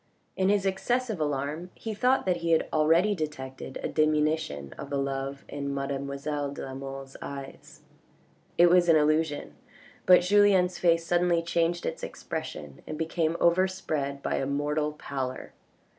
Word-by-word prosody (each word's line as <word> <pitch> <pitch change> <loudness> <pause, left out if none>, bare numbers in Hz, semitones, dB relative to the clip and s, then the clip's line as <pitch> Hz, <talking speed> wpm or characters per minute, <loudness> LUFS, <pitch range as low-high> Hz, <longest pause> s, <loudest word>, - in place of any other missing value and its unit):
In 190 0 +2
his 200 -1 +2
excessive 220 +2 0
alarm 150 +3 -2
he 225 - -5
thought 250 +5 +2
that 180 -2 +1
he 165 -1 +2
already 165 +7 +4
detected 135 -6 -5
a - - 0
diminution 155 - 0
of 140 - -8
the 140 - -1
love 135 0 -3
in 140 -1 -4
mademoiselle 140 +1 -3
de 140 - -7
la 135 - -7
Mole's 135 0 -7
eyes. 140 -1 -9 0.8
It 175 - +7
was 175 -1 +5
an 165 - +7
illusion, 155 - +1 0.5
but 180 -1 +8
Julien's 190 -1 +4
face 165 -1 +3
suddenly 175 0 +2
changed 170 0 0
its - - -3
expression 75 -3 -6
and 155 - -5
became 165 0 -1
overspread 165 -6 +1
by - - 0
a 135 - -1
mortal 150 +2 -1
pallor. 135 -3 -5
155 Hz, 145 wpm, -28 LUFS, 140-175 Hz, 0.8 s, but